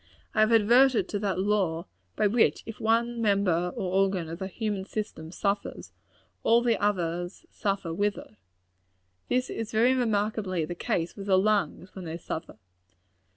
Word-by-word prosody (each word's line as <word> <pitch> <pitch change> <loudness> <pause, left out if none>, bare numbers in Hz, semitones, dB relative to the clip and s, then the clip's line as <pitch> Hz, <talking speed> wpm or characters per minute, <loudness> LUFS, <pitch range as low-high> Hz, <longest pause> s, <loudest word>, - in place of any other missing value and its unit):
I - - 0
have 215 +1 +5
adverted 235 +3 +5
to 205 - -2
that 200 -2 -1
law, 190 -4 0 0.3
by - - +1
which, 220 +3 +3
if 225 - -8
one 230 +1 +1
member 190 -5 +2
or 185 -1 -3
organ 190 -4 0
of 165 +2 -6
the 190 - -3
human 205 -1 -3
system 190 -6 -5
suffer, 200 +2 -2 0.6
all 235 +1 +4
the 235 -4 +1
others 175 -3 -1
suffer 195 -5 -2
with 205 +3 0
it. - - -11 1.0
This 250 0 0
is 225 -1 -4
very 235 +4 +4
remarkably 210 -7 0
the 175 - -5
case 175 -2 -2
with 200 -1 -8
the 190 -1 +5
lungs, 200 -2 0
when 185 -2 -8
they 165 0 -4
suffer. 160 -7 -6
200 Hz, 160 wpm, -27 LUFS, 180-220 Hz, 1.0 s, have